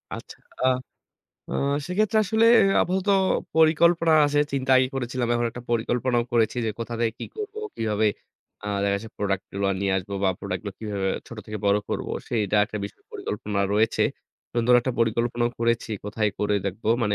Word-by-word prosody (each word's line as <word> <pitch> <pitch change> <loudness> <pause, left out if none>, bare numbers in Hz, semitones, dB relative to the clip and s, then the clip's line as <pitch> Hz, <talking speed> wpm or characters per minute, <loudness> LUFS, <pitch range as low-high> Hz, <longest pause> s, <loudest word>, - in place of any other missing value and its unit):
আচ্ছা। - - -10 0.3
আ - - +4 0.8
আ - - -4 0.3
সেক্ষেত্রে 210 +4 +1
আসলে 220 +3 +3 0.4
আপাতত 190 +2 -1 0.5
পরিকল্পনা 165 +1 +4
আছে। 145 0 +1
চিন্তা 135 -1 -1
আগেই 130 0 +3
করেছিলাম। 125 -1 -2
এখন 120 0 +1
একটা 120 - -9
পরিকল্পনাও 120 +1 +1
করেছি 115 0 +2
যে - - +1
কোথা 115 +1 -4
থেকে 115 -1 +1
কি - - -5
করব, 425 -1 -5 0.2
কিভাবে 110 -1 +1 0.6
আ - - -5 0.2
দেখা 100 0 +2
যাচ্ছে 110 +2 -8
product 100 -2 -1
গুলো 100 0 -1
নিয়ে 100 -1 +1
আসব 95 +1 -4
বা 95 - +4
product 90 - -3
গুলো 100 - -4
কিভাবে 100 -3 -2 0.2
ছোট 115 - -10
থেকে 105 -1 -5
বড় 100 +1 +4
করব। - - -3 0.2
সেটা 105 -3 0
একটা 105 - -7
বিষয়ে 100 - -10
পরিকল্পনা 105 -1 -3
রয়েছে। 110 +1 +2 0.5
সুন্দর 120 +1 +3
একটা 130 +2 -2
পরিকল্পনাও 120 +1 +1
করেছি 115 0 0
কোথায় 105 0 0
করে 105 0 +1
দেখব। 100 +4 -5 0.2
মানে 105 -2 +1
115 Hz, 170 wpm, -25 LUFS, 105-130 Hz, 0.8 s, আ